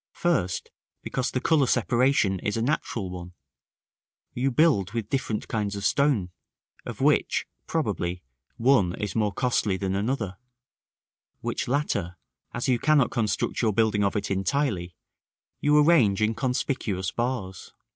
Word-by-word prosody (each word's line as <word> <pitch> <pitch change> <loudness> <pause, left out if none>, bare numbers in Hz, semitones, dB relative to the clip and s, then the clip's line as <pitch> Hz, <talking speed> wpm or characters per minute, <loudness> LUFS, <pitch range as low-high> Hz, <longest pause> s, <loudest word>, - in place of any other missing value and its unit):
First, 125 - -1 0.3
because 130 0 -2
the 125 - -1
color 145 -1 +3
separation 120 -5 +2
is 105 +4 -2
a - - 0
natural 115 -8 -2
one. 90 -1 -8 1.0
You 130 +2 0
build 125 - +2
with 115 -3 -3
different 125 -5 -2
kinds 105 -2 -2
of 100 0 -4
stone, 135 -11 +2 0.6
of - - -6
which, - - +2 0.2
probably, 90 +1 -2 0.3
one 115 -8 +3
is 105 -4 -4
more 105 -2 +1
costly 110 -4 0
than 95 -1 -2
another; 100 -2 -2 1.0
which - - -3
latter, 100 - -1 0.3
as - - -3
you 125 -2 +2
cannot 145 -2 +3
construct 110 -5 -1
your 110 -3 +2
building 110 -1 +2
of 100 - 0
it 105 - -2
entirely, 95 - -1 0.6
you 150 0 +3
arrange 145 - +5
in 110 +1 +2
conspicuous 115 -6 -2
bars. 115 -6 -3
110 Hz, 135 wpm, -26 LUFS, 95-130 Hz, 1.0 s, arrange